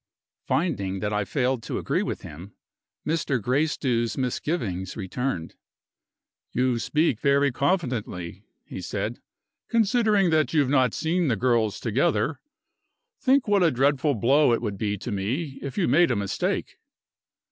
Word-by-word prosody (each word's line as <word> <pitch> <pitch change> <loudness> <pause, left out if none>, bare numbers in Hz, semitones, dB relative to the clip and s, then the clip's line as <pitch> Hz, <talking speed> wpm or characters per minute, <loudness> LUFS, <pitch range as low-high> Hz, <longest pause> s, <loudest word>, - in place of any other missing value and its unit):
Finding 100 - -1
that 105 +2 -2
I 105 -1 0
failed 130 0 0
to - - -4
agree - - 0
with - - -4
him, 90 +7 -10 0.5
Mr. 150 -4 0
Gracedieu's 125 -1 0
misgivings 120 - -2
returned. 95 -3 -3 1.0
"You 125 -1 +1
speak 150 -2 +1
very 140 0 +3
confidently," 120 - -2 0.2
he - - -7
said, - - -3 0.5
"considering 215 -4 +3
that 155 0 +2
you - - +5
have 135 -1 0
not 130 -5 +3
seen 170 +1 0
the 120 - +2
girls 115 -2 +1
together. 140 +6 0 0.8
Think 270 -1 +3
what 205 -2 +3
a 170 - +5
dreadful 140 +1 +2
blow 130 +4 +4
it - - 0
would 100 -4 -3
be 105 -1 -1
to 115 +5 -6
me 130 - -3
if 140 -3 -6
you - - +2
made 165 +7 +4
a 120 - +1
mistake." 100 -2 -2
130 Hz, 145 wpm, -25 LUFS, 110-155 Hz, 1.0 s, you